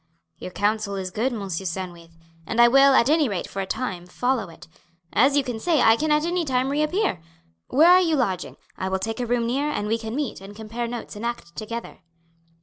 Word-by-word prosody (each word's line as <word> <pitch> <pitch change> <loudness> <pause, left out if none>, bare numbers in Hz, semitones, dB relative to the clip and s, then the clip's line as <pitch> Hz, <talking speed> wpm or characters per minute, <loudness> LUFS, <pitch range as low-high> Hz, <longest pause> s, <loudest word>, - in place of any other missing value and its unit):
"Your - - -6
counsel 205 +1 -1
is 185 -1 -4
good, 235 +7 -1
Monsieur 195 -5 -4
Sandwith, 170 -2 -7 0.3
and 230 - -2
I 240 - +8
will, 275 +2 +6
at 235 - +4
anyrate 285 - +1
for 195 - -4
a 190 - -4
time, 190 -8 -4
follow 245 +1 -1
it. 165 - -14 0.5
As 275 +6 +4
you 285 - +3 0.2
say, 325 +3 +1
I 225 0 +6
can 310 +6 -1
at 300 +1 +3
anytime 275 -7 0
reappear. 305 - 0 0.5
Where 320 +6 +5
are 365 +1 +7
you 330 -3 +2
lodging? 190 - -2 0.2
I 190 - -2
will 190 - 0
take 220 +5 -4
a 245 - -2
room 240 0 +1
near, 275 +5 0
and 210 -8 -2
we 225 +2 0
can 225 +1 -5
meet 280 -9 -3
and 200 +1 -11
compare 225 +2 -5
notes 235 -2 -7
and 210 - -8
act 235 -8 -5
together." 230 +2 -6
230 Hz, 210 wpm, -24 LUFS, 195-275 Hz, 0.5 s, I